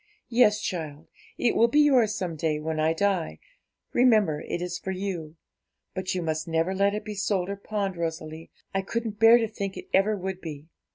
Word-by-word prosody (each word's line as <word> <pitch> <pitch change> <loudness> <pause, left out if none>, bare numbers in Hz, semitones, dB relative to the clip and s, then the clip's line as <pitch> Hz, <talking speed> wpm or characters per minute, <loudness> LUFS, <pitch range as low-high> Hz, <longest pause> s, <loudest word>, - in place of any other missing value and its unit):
'Yes, 230 -3 +4
child; 155 -3 -4 0.3
it 240 - +1
will 230 - +5
be 295 +6 +4
yours 250 -8 +4
some 180 -6 -3
day, 155 -1 -1
when 155 0 -3
I 155 +1 +3
die; 170 - 0 0.6
remember, 215 -11 +4
it - - -2
is 180 0 -4
for - - -6
you; 185 -5 -4 0.6
but 185 0 -3
you 180 - -1
must 160 0 -2
never 165 +3 0
let 200 +1 +2
it 210 0 -5
be 215 - -5
sold 195 -2 -1
or 200 - -2
pawned, 200 -1 -3
Rosalie, 160 -1 -5 0.2
I 195 - +1
couldn't 220 +1 -4
bear 225 +1 +8
to 230 -2 0
think 200 -2 -5
it - - -9
ever 205 +2 +3
would 190 0 -5
be. 150 -3 -7
190 Hz, 195 wpm, -26 LUFS, 160-210 Hz, 0.6 s, bear